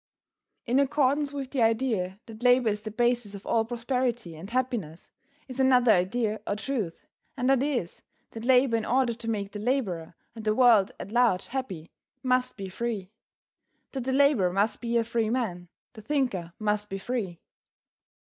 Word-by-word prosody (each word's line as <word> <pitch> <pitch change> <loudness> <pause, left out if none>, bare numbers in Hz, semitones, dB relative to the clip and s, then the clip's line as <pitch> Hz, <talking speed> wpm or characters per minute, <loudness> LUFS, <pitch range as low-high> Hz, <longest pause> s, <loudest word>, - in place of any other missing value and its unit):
In 250 +3 +2
accordance 280 +1 +2
with 275 -2 -5
the 270 - 0
idea 225 -5 +1
that 225 0 -11
labor 245 -1 +5
is 210 0 -2
the 215 - -5
basis 240 -2 0
of 200 - -10
all 225 - +2
prosperity 240 -5 -2
and 170 +6 -9
happiness, 230 - -3 0.4
is 260 0 -7
another 250 -3 +5
idea 215 +3 +1
or 205 - 0
truth, 215 -6 -4 0.3
and 250 -1 0
that 270 -1 +4
is, 260 - -2 0.3
that 225 - -8
labor 250 -1 +4
in 225 - 0
order 250 0 +2
to 230 0 -6
make 200 -3 -2
the 210 - -6
laborer 205 -9 -1 0.2
and 225 - -9
the 215 0 +1
world 230 -6 +5
at 200 - -7
large 235 -6 +2
happy, 195 -12 -5 0.3
must 255 -2 +1
be 195 -1 -5
free. 200 -1 -4 0.8
That 265 -3 -4
the 265 - 0
laborer 265 -9 +4
must 200 +4 0
be 235 -1 0
a 230 - +3
free 230 -1 -1
man, 205 -8 -2 0.3
the 220 - -11
thinker 210 - -1
must 210 -1 -1
be 195 - -3
free. 195 -5 -3
230 Hz, 175 wpm, -27 LUFS, 200-255 Hz, 0.8 s, labor